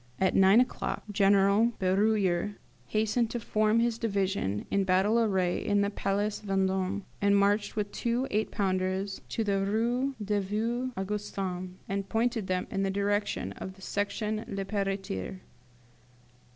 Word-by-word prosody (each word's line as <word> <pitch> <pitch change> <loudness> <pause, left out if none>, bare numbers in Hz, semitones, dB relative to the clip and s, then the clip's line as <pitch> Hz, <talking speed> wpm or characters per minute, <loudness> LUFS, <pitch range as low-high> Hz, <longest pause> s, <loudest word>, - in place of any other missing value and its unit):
At 190 -1 +2
nine 195 +3 +6
o'clock 250 0 -1
General 200 +3 +4
Beruyer 195 0 +1 0.3
hastened 220 +2 +1
to 240 - -3
form 215 0 +2
his 235 -1 +1
division 195 - -1
in 200 - +2
battle 190 +5 +3
array 190 -6 +1
in 205 -1 +2
the 200 0 0
Place 205 +1 -1
Vendôme, 190 0 0 0.2
marched 200 +1 +3
with 205 -1 -2
two 240 +4 -1
eight 215 +1 0
pounders 190 0 -1
to 225 - -1
the 200 -2 +1
Rue 240 +6 0
des 205 0 +1
Vieux 230 +6 -1
Augustins, 190 -2 -3
and 195 0 -3
pointed 225 -2 0
them 185 -1 0
in 195 - -1
the 195 - +1
direction 200 - -1
of 190 - -7
the 190 - -18
Section 210 +2 -2
Le 195 -1 -3
Pelletier. 195 - -3
200 Hz, 140 wpm, -29 LUFS, 190-215 Hz, 0.3 s, nine